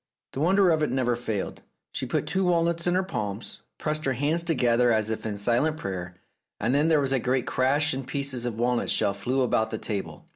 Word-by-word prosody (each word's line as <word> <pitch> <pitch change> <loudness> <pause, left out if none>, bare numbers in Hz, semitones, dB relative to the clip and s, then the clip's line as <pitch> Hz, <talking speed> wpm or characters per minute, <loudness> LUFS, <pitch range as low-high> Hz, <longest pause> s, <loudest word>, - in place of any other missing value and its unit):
The - - -4
wonder 185 +3 +4
of 160 -1 +2
it 150 - +1
never 125 -2 +1
failed: 110 -4 -4 0.3
she - - -4
put - - -1
two 190 0 0
walnuts 170 -1 +1
in 175 - +2
her 185 - +2
palms, 105 - -5 0.2
pressed 155 0 -2
her 135 - +1
hands 145 +6 0
together 125 -7 +2
as 110 -1 +1
if 110 - -3
in 105 -2 -3
silent 120 +9 +1
prayer, 90 - -5 0.4
and 120 - 0
then 145 +3 +3
there 160 -2 +4
was 135 -1 0
a 135 - +2
great 125 +1 0
crash 145 +4 +2
and 130 -1 -5
pieces 135 -4 -2
of 115 -2 -4
walnut 120 +1 0
shell 100 - +2
flew 125 +6 0
about 110 -2 +1
the 110 - -3
table. 95 -9 -5
130 Hz, 220 wpm, -26 LUFS, 110-155 Hz, 0.4 s, wonder